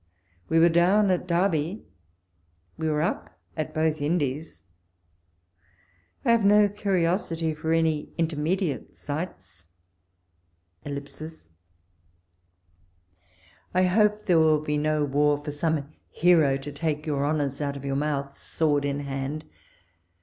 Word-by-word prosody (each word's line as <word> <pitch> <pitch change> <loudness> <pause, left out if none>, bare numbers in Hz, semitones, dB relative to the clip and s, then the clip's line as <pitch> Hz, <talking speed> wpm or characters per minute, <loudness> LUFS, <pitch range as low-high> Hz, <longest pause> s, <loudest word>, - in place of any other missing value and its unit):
We 165 - +2
were 165 +1 +7
down 185 +4 +4
at 180 0 -1
Derby, 170 +1 0 0.9
we 160 - -2
were 150 0 +1
up - - -3 0.2
at 155 -1 -3
both 155 -1 0
Indies; 150 -1 -2 1.6
I - - +4
have 230 -2 +3
no 205 +1 +6
curiosity 175 -5 0
for 160 +1 -3
any 160 -2 +1
intermediate 160 - -1
sights.... 95 - -6 1.2
I 145 - -4 2.9
hope 210 +3 +2
there 175 -3 +4
will 155 -1 +4
be 150 -1 -2
no 155 0 +1
war 145 +1 +2
for 150 - -3
some 150 -1 -1 0.2
hero 160 -5 +4
to 140 +2 -7
take 150 0 -2
your 145 -3 -1
honours 145 -1 -1
out 140 -1 -2
of 140 - -9
your 135 -1 -1
mouth, 140 -1 -2
sword 145 -3 0
in 140 0 -2
hand. 140 +2 -4
155 Hz, 120 wpm, -26 LUFS, 145-170 Hz, 2.9 s, were